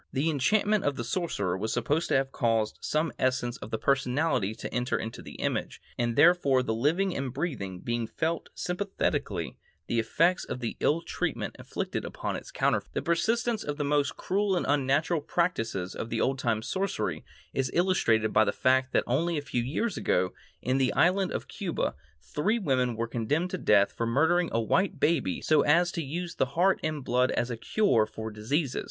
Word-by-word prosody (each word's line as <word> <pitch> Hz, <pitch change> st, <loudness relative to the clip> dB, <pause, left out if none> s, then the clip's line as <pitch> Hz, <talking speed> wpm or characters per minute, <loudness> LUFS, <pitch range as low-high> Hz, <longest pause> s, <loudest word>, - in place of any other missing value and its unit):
The 145 Hz, +5 st, +1 dB
enchantment 205 Hz, +8 st, +2 dB
of 145 Hz, -, 0 dB
the 120 Hz, -, -3 dB
sorcerer 115 Hz, -, -1 dB
was 110 Hz, +4 st, -2 dB
supposed 145 Hz, +8 st, 0 dB
to -, -, +1 dB
have 135 Hz, 0 st, +1 dB
caused 115 Hz, -4 st, 0 dB
some 155 Hz, +2 st, 0 dB
essence 125 Hz, -2 st, 0 dB
of 105 Hz, -, -9 dB
the 110 Hz, -, -2 dB
personality 130 Hz, -4 st, +1 dB
to -, -, -7 dB
enter 125 Hz, +1 st, 0 dB
into 110 Hz, +1 st, -6 dB
the -, -, -10 dB
image, -, -, -2 dB, 0.2 s
and 120 Hz, -1 st, -1 dB
therefore 145 Hz, -4 st, +5 dB
the 110 Hz, -, -1 dB
living 165 Hz, +11 st, +1 dB
and 135 Hz, -2 st, -2 dB
breathing 120 Hz, -, -4 dB
being 120 Hz, -1 st, -2 dB
felt 165 Hz, +5 st, -2 dB
sympathetically 190 Hz, +2 st, -2 dB, 0.3 s
the 115 Hz, -, 0 dB
effects 165 Hz, +11 st, +2 dB
of -, -, -5 dB
the 120 Hz, -2 st, -3 dB
ill 165 Hz, +3 st, +1 dB
treatment -, -, -3 dB
inflicted -, -, -4 dB
upon -, -, -4 dB
its -, -, -7 dB
counterfeit. -, -, 0 dB
The -, -, -1 dB
persistence 225 Hz, +6 st, +1 dB
of 145 Hz, 0 st, -4 dB
the 150 Hz, -, -1 dB
most 145 Hz, 0 st, +1 dB
cruel 200 Hz, 0 st, 0 dB
and 175 Hz, -, 0 dB
unnatural 145 Hz, +3 st, +2 dB
practices 115 Hz, -, -1 dB
of 115 Hz, -, -6 dB
old 135 Hz, +2 st, +1 dB
time 110 Hz, -3 st, 0 dB
sorcery 195 Hz, -, -2 dB, 0.3 s
is 130 Hz, -1 st, 0 dB
illustrated 120 Hz, -, +2 dB
by 110 Hz, -, +6 dB
the -, -, +1 dB
fact 130 Hz, 0 st, +2 dB
that -, -, +3 dB
only 160 Hz, +7 st, 0 dB
a -, -, -1 dB
few 125 Hz, -4 st, -1 dB
years 170 Hz, -, -2 dB
ago, 90 Hz, 0 st, +1 dB, 0.3 s
in 130 Hz, +2 st, +1 dB
the 130 Hz, -1 st, +2 dB
island 180 Hz, +6 st, +3 dB
of -, -, -4 dB
Cuba, -, -, -2 dB, 0.3 s
three 195 Hz, -, 0 dB
women 130 Hz, -, +1 dB
were 115 Hz, +1 st, -1 dB
condemned 145 Hz, +10 st, -1 dB
to -, -, -2 dB
death 100 Hz, -1 st, +4 dB
for 115 Hz, -, -2 dB
murdering 160 Hz, +8 st, +2 dB
a 115 Hz, -, +1 dB
white 185 Hz, -, +1 dB
baby 135 Hz, -, +1 dB
so 155 Hz, -2 st, +4 dB
as 170 Hz, +4 st, +3 dB
to 170 Hz, -, -3 dB
use 170 Hz, +4 st, -4 dB
the -, -, 0 dB
heart 190 Hz, +2 st, +4 dB
and 155 Hz, -4 st, -3 dB
blood 125 Hz, +1 st, +2 dB
as 120 Hz, +1 st, -1 dB
a -, -, -2 dB
cure 115 Hz, -, +2 dB
for 110 Hz, +1 st, -6 dB
diseases. 130 Hz, +7 st, -1 dB
140 Hz, 190 wpm, -28 LUFS, 115-170 Hz, 0.3 s, by